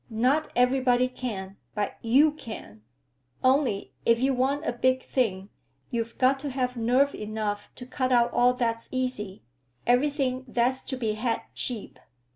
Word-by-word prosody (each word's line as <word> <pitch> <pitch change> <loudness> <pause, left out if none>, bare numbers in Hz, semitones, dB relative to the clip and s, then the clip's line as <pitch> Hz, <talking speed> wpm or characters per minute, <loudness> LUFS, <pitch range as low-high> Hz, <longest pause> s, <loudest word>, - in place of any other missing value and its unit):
"Not 255 +7 +2
everybody 250 0 +3
can, 200 -7 -6 0.2
but 205 -1 -2
you 275 +7 +5
can. 220 - -9 0.6
Only, 255 -6 +2
if 230 0 +4
you 265 +2 +2
want 275 +4 0
a - - 0
big 255 +2 +1
thing, 200 -6 -1 0.4
you've 230 -1 -3
got 265 +1 +3
to 285 +1 -4
have 255 -1 -1
nerve 250 +5 +2
enough 210 -1 -3
to 250 - -9
cut 255 0 -1
out 240 -1 +4
all 250 +1 +4
that's 230 -2 -1
easy, 250 -7 -3 0.4
everything 260 0 +1
that's 250 +2 +1
to 260 - -3
be 225 -4 -1
had 230 +2 -1
cheap." 235 -5 -2
250 Hz, 150 wpm, -27 LUFS, 225-260 Hz, 0.6 s, you